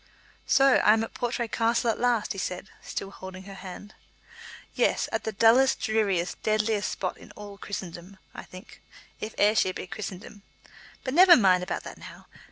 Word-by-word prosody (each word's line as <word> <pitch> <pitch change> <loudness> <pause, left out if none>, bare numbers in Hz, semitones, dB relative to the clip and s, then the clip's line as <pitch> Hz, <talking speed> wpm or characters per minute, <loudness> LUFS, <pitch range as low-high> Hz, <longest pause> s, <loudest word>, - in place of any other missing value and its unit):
"So 270 -1 +5
I 210 - +5
am 220 0 +1
at 225 - -7
Portray 240 0 -2
Castle 230 +1 +1
at - - -6
last," 240 -3 +1
he 195 - -7
said, 180 +1 -5
still 195 - -6
holding 190 -1 -10
her 195 +1 -10
hand. 195 +2 -10 0.8
"Yes, - - +1
at - - -3
the 220 - -1
dullest, 230 +5 +4
dreariest, 200 -5 -1
deadliest 215 -1 0
spot 185 - -4
in - - -15
all 205 -1 -11
Christendom, 185 -1 -7 0.2
I - - -8
think, 185 +5 -14 0.4
if 215 - -6
Ayrshire 205 -2 +3
be - - -6
Christendom. 200 +1 -8 0.6
But 260 - -3
never 355 +2 +8
mind 185 -5 +4
about 180 - -4
that - - -10
now. - - -12
210 Hz, 175 wpm, -26 LUFS, 190-225 Hz, 0.8 s, never